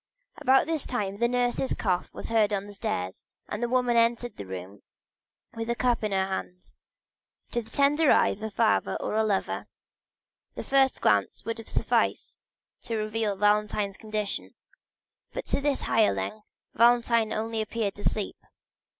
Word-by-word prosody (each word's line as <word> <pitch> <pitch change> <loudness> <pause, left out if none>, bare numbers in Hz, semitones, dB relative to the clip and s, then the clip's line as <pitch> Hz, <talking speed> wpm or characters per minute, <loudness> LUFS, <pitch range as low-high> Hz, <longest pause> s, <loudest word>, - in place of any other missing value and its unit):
About 265 -2 +4
this 320 -2 -2
time 200 -5 -2
the 235 - +3
nurse's 245 +1 0
cough 180 -4 -1
was - - -6
heard 220 -2 +3
on 200 -1 -1
the 205 - -10
stairs 90 - -4 0.2
and 210 - -4
the 240 - 0
woman 250 -1 +2
entered 235 +1 +2
the 100 - -8
room 95 +2 -8 0.7
with 225 0 -5
a 235 - +1
cup 245 -2 +1
in 210 - -1
her 190 -1 +2
hand. 180 -1 -6 0.8
To 235 - 0
the 225 - -15
tender 290 +2 +3
eye - - +5
of 205 - -5
a 220 - -3
father 220 +1 +2
or - - -3
a 220 +1 +2
lover, 205 -3 -1 0.9
the - - -5
first 270 -1 +2
glance 100 - +2
would 230 +1 -3
have 225 - -10
sufficed - - 0 0.5
to 230 - -2
reveal 215 -1 -1
Valentine's 210 0 +1
condition; 215 -2 -4 0.8
but - - -4
to - - -1
this 285 -1 0
hireling, 215 -1 +1 0.3
Valentine 235 -1 +4
only 225 0 -1
appeared 215 -2 -2
to 205 - -11
sleep. 210 - -1
220 Hz, 165 wpm, -27 LUFS, 205-240 Hz, 0.9 s, eye